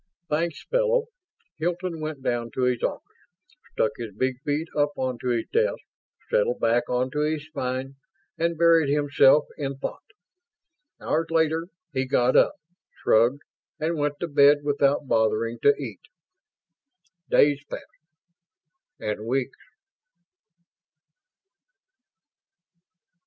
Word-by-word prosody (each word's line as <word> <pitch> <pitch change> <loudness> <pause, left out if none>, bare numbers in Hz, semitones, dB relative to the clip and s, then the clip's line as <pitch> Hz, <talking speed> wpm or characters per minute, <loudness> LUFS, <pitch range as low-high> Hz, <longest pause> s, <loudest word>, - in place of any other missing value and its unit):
"Thanks, 165 +1 -1
fellow." - - +1 0.5
Hilton 175 0 -2
went 155 -3 -5
down 120 -2 -1
to 130 - 0
his 125 -2 +1
office, - - -4 0.5
stuck 110 - +1
his 115 -5 -7
big 130 +2 -1
feet 150 +3 -1
up 145 0 +1
onto 130 -1 -3
his 120 -2 0
desk, 470 +2 +2 0.5
settled - - +1
back 120 +2 +1
onto 130 +4 -1
his 150 0 -1
spine, 135 -3 -4 0.4
and 170 0 -1
buried 165 -3 +4
himself 145 0 +4
in 140 -2 -3
thought. 135 - -5 1.0
Hours 165 +1 -1
later 160 0 +1 0.3
he 130 -1 -1
got 125 0 +2
up, - - +5 0.5
shrugged, 120 +6 +3 0.4
and 160 +2 -1
went 145 0 0
to 175 - -1
bed 145 -1 +5
without 145 -1 +1
bothering 115 0 +1
to 430 - +5
eat. - - -7 1.3
Days 145 0 +4
passed. - - -7 1.2
And 105 +1 -4
weeks. 130 +1 -2
145 Hz, 115 wpm, -25 LUFS, 130-160 Hz, 1.3 s, up